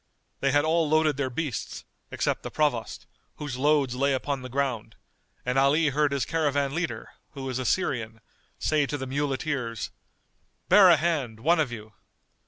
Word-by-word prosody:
They 135 - +1
had 145 +2 +3
all 160 -1 +2
loaded 155 -2 +3
their 140 -2 -1
beasts, 140 -1 -4 0.2
except - - -1
the - - -6
Provost, 145 -7 -1 0.3
whose 145 -4 -5
loads 140 -1 +2
lay 140 +2 +1
upon 135 +1 -2
the 130 - -7
ground, 125 -4 -2 0.5
and 125 +2 +1
Ali 150 +3 +3
heard 145 +1 +1
his 140 -3 0
caravan 145 -4 0
leader, 160 -9 -3 0.2
who 135 -2 -7
was 130 -1 -3
a 130 - -3
Syrian, 115 -9 -1 0.4
say 150 -2 +1
to 145 - -3
the 135 - -5
muleteers, 135 -3 -2 0.8
"Bear 195 -3 +8
a 170 - +7
hand, 140 -9 -1
one 165 +5 +3
of 145 -6 +1
you!" 110 -2 -9
140 Hz, 170 wpm, -26 LUFS, 125-150 Hz, 0.8 s, Bear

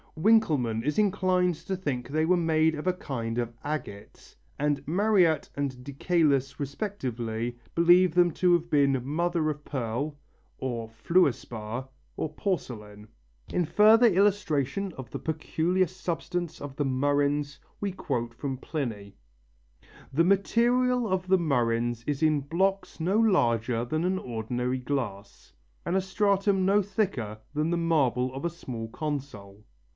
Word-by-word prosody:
Winkelmann 155 - +2
is 150 - 0
inclined 185 -3 +2
to 190 +5 -4
think 135 -9 -3
they 155 +2 +1
were 180 +3 +4
made 160 -2 +2
of 150 - -6
a 185 - +3
kind 120 -9 -4
of 120 -1 -2
agate, 145 -9 -6 0.2
and 145 -1 0
Mariette 180 -3 +3
and 135 -3 -3
de 140 - -8
Caylus 140 -4 +1
respectively 120 - -3 0.2
believe 175 +1 +5
them 175 -1 +4
to 180 +3 +2
have 170 0 +1
been 140 -4 +2
mother 165 +2 0
of 150 -1 -5
pearl, 135 +3 -3 0.4
or 120 -3 -4
fluor 140 +9 +3
spar, 115 +3 -7 0.3
or 155 - -3
porcelain. 105 - -4 0.5
In 180 - +2
further 220 +7 +6
illustration 195 - +1
of 130 -3 -8
the - - -5
peculiar 165 +3 0
substance 175 -1 -4
of 145 -2 -7
the 145 - -1
murrhines 145 +2 0 0.2
we 200 -1 -2
quote 120 -10 -3
from 135 +2 -4
Pliny: 115 -10 -5 1.0
"The 155 +5 +3
material 240 +5 +2
of 185 -1 -1
the 190 0 +5
murrhines 120 -6 0
is 145 0 -2
in 155 -2 +3
blocks 190 +8 -1
no 185 +6 +1
larger 120 - +2
than 155 +6 -1
an 185 +1 0
ordinary 125 - -3
glass, 120 -7 -5 0.3
and 180 - -1
a 190 - +3
stratum 195 0 +1
no 200 +2 +4
thicker 185 - -2 0.2
than 155 +2 0
the 175 - +1
marble 130 -7 +1
of 135 - -6
a 170 - +1
small 120 -9 -7
console. 115 -9 -6
150 Hz, 145 wpm, -27 LUFS, 125-180 Hz, 1.0 s, further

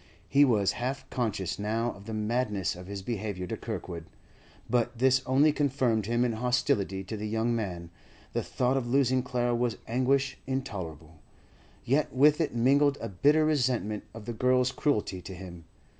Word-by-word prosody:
He 140 +1 +5
was 110 -8 +3
half 135 +2 -3
conscious 100 -8 -2
now 115 +3 0
of 100 - -13
the 110 - -4
madness 105 -4 -1
of 90 +1 -10
his 100 -1 -6
behaviour 105 -4 -3
to - - -4
Kirkwood, 85 -2 -6 0.6
but 120 0 0
this 130 +1 +4
only 140 +4 +5
confirmed 130 -7 +1
him 120 +1 +2
in 120 - +1
hostility 110 -5 0
to 105 +4 -6
the 105 0 -4
young 115 +2 0
man; 90 -6 -4 0.4
the - - 0
thought 125 +2 0
of 125 -3 -2
losing 130 0 +3
Clara 120 -1 0
was 120 -1 0
anguish 130 +3 +1
intolerable, 85 - -5 0.7
yet 140 +5 +1
with 150 +4 +4
it 150 -7 -1
mingled 140 +4 +4
a 115 - -4
bitter 145 +11 +3
resentment 125 -8 0
of 115 -2 -9
the 120 - -4
girl's 125 +2 +2
cruelty 105 -11 -1
to 95 +1 -8
him. 90 -2 -10
120 Hz, 170 wpm, -29 LUFS, 100-130 Hz, 0.7 s, He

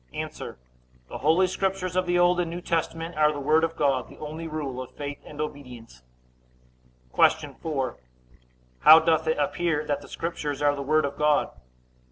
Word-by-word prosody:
A. - - -2 0.8
The - - -7
Holy 160 +6 +4
Scriptures 185 -1 -2
of 185 -1 +1
the 175 0 +2
Old 175 0 +4
and 175 -2 0
New 170 +1 -5
Testament 165 0 -2
are 150 0 +4
the 145 - -5
Word 155 +3 +3
of 165 0 0
God, 135 -5 0
the - - -14
only 155 +2 -6
rule 145 -5 -4
of 130 - -8
faith 145 -1 -6
and 150 - -11
obedience. 125 - -7 1.1
Q. - - +2
4. 135 -6 -2 0.8
How 155 - +9
doth 160 -1 +1
it 160 - +1
appear 155 +1 0
that 145 -1 -2
the - - -12
Scriptures 150 -4 -4
are 145 0 +3
the 140 - -5
Word 155 +2 +2
of 140 - -5
God? 150 -1 +2
155 Hz, 180 wpm, -26 LUFS, 145-165 Hz, 1.1 s, How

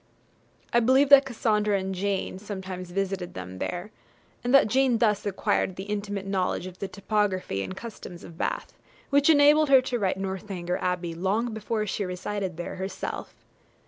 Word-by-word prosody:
I 235 - +6
believe 260 +4 +4
that 280 -1 +9
Cassandra 210 -4 +1
and 190 0 -3
Jane 190 0 -2
sometimes 190 -3 -6
visited 190 -1 -3
them 90 0 -7
there, 180 +4 -4 0.5
and 245 - 0
that 275 - +7
Jane 255 +1 +3
thus 210 -3 +1
acquired 190 -1 0
the 190 - -6
intimate 205 -1 -3
knowledge 190 -2 -1
of 185 0 -9
the 195 - -3
topography 200 - -1
and 185 - -5
customs 210 -6 -9
of 170 - -11
Bath, - - -3 0.4
which 285 +2 +4
enabled 300 0 +6
her 265 -2 +7
to 250 -2 -2
write 190 -3 0
'Northanger 190 -2 -3
Abbey' 180 -2 -1
long 205 +7 -1
before 215 0 -2
she 205 0 -2
resided 185 0 -4
there 175 - -5
herself. 190 +1 -5
200 Hz, 165 wpm, -26 LUFS, 185-225 Hz, 0.5 s, that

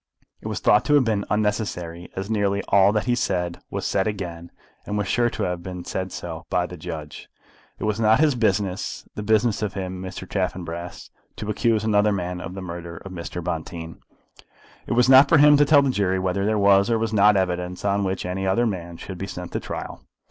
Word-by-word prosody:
It - - -7
was - - -3
thought 105 +2 +4
to 150 - +4
have 145 - +5
been 110 -4 0
unnecessary, 105 -5 -2
as 95 +1 -4
nearly 100 -2 0
all 100 0 +5
that 105 -1 0
he 125 - +2
said 90 -6 -1
was - - -4
said 95 +1 +1
again 85 -5 -5 0.3
and 105 - -3
was 105 -1 -1
sure 120 +3 +2
to - - -4
have 90 -1 -2
been 90 -1 -7
so 95 0 -3
said, 85 -3 -7
by 90 -1 +1
the 90 - -8
judge. 80 -3 -8 0.5
It - - -7
was 105 0 -1
not 110 0 +4
his 155 -2 +4
business, 100 -5 -1
the - - -5
business 110 +1 +2
of 105 -3 -3
him, 95 -1 -4
Mr. 95 0 -7
Chaffanbrass, 85 -3 -4 0.2
to 105 0 -4
accuse 110 0 +1
another 105 -1 +3
man 90 -2 -3
of 90 +1 -7
the 95 - -6
murder 85 -1 -7
of 95 - -10
Mr. 90 -1 -6
Bonteen. 80 -1 -5 0.9
It - - -1
was 125 +1 +4
not 135 +2 +8
for 165 - +6
him 145 +1 +7
to 145 - +5
tell 145 -1 +6
the 135 - +1
jury 95 -5 0
whether 95 +2 -1
there 110 0 +1
was 100 +1 +4
or 115 - +2
was 110 -1 -2
not 105 0 +5
evidence 90 0 -2
on 100 0 +1
which 95 0 -2
any 95 +1 -2
other 115 +6 +2
man 85 -6 -4
should 95 0 -8
be 95 - -4
sent 90 -2 -7
to - - -2
trial. - - -6
95 Hz, 220 wpm, -23 LUFS, 90-110 Hz, 0.9 s, not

